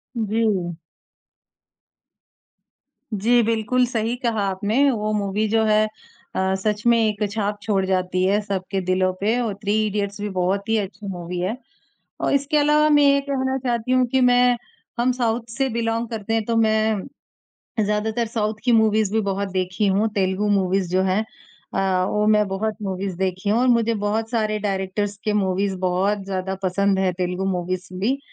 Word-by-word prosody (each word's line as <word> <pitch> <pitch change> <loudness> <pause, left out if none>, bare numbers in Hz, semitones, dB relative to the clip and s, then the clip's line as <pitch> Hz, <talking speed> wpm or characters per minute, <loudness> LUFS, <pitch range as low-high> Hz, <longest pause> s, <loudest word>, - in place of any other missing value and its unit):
जी। 215 -6 0 2.4
जी 240 +4 +4
बिल्कुल, 230 +3 +1
सही 230 -1 -1
कहा 235 -4 -1
आपने 215 +9 +2
वो 215 -3 -2
मूवी 205 +1 0
जो 220 +1 +2
है 215 0 +3 0.5
अ, 190 0 +1
सच 210 +2 -2
में 235 0 +5
एक 215 -2 +1
छाप 205 -1 -2
छोड़ 200 -2 0
जाती 185 -1 0
है 200 +2 +3
सबके 195 -1 -3
दिलों 185 0 +1
पे 220 +4 +1
और 230 -4 -1
थ्री 205 0 +1
इडियट्स 205 0 -3
भी 210 - -2
बहुत 190 +3 0
ही 225 - +3
अच्छी 200 0 -5
मूवी 180 -1 -5
है। 185 +6 -1 0.7
और - - +1
इसके 280 +2 +1
अलावा 300 +1 +4
मैं 295 -1 +5
ये 280 0 +5
कहना 265 -1 -1
चाहती 240 0 -1
हूँ 255 0 +4
कि 265 - +3
मैं, 245 0 +4 0.4
हम 245 +2 +3
साउथ 240 -2 0 0.2
से 270 - +2
बिलॉन्ग 230 0 -1
करते 225 -1 -4
हैं 225 -1 +1
तो 230 - -1
मैं 220 -2 +2 0.8
ज़्यादातर 215 +3 -1
साउथ 215 -1 -1
की 245 - +3
मूवीज़ 220 -2 +3
भी 220 - +2
बहुत 195 +1 -1
देखी 185 +2 -1
हूँ, 200 +3 +2
तेलुगु 190 +1 0
मूवीज़ 190 -2 +1
जो 185 +1 +3
हैं। 190 +2 +1 0.5
अ, 190 -1 +1
वो 210 0 +1
मैं 210 -1 +4
बहुत 210 +3 -2
मूवीज़ 190 -1 -3
देखी 185 +2 -1
हूँ 220 - +3
और 255 - +3
मुझे 230 0 +1
बहुत 220 +2 -1
सारे 215 -3 0
डायरेक्टर्स 200 0 -2
के 215 - +1
मूवीज़ 190 +1 0
बहुत 195 +3 0
ज़्यादा 190 0 -3
पसंद 195 +1 +1
हैं, 190 -1 +1
तेलुगु 180 +1 -1
मूवीज़ 180 0 -3
भी 255 +8 +1
210 Hz, 170 wpm, -22 LUFS, 190-225 Hz, 2.4 s, में